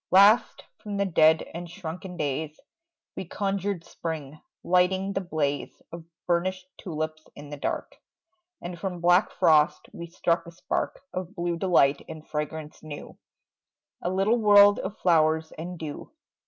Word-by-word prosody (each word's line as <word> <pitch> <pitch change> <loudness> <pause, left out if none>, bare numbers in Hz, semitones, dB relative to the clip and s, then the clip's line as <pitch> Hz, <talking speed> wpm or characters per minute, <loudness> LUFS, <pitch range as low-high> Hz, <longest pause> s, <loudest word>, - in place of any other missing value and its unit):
Last, 200 +5 +5 0.2
from 205 -2 -5
the 200 - +1
dead 160 -3 +4
and 175 0 -6
shrunken 180 +1 -7
days 150 +1 -3 0.6
We - - -4
conjured 195 -1 -2
spring, 155 -4 -6 0.2
lighting 185 +2 +2
the 195 - -1
blaze 150 -5 -2
Of 170 -1 -9 0.2
burnished 185 +1 -1
tulips 155 -2 -5
in 145 0 -11
the 145 - -6
dark; - - -4 0.7
And 175 -1 -6
from 180 -1 -4
black 175 +3 +4
frost 155 -3 +3
we 170 - -7
struck 170 0 0
a - - -9
spark 170 - -3
Of 185 +2 -5
blue 175 -1 -1
delight 165 -6 +3
and 155 -1 -9
fragrance 150 0 -5
new, 150 -2 -9 0.8
A 175 - -1
little 195 +5 +2
world 205 -1 +7
of 200 +3 -5
flowers 160 -2 +2
and 175 +3 -7
dew. 155 -3 -7
170 Hz, 145 wpm, -26 LUFS, 155-190 Hz, 0.8 s, world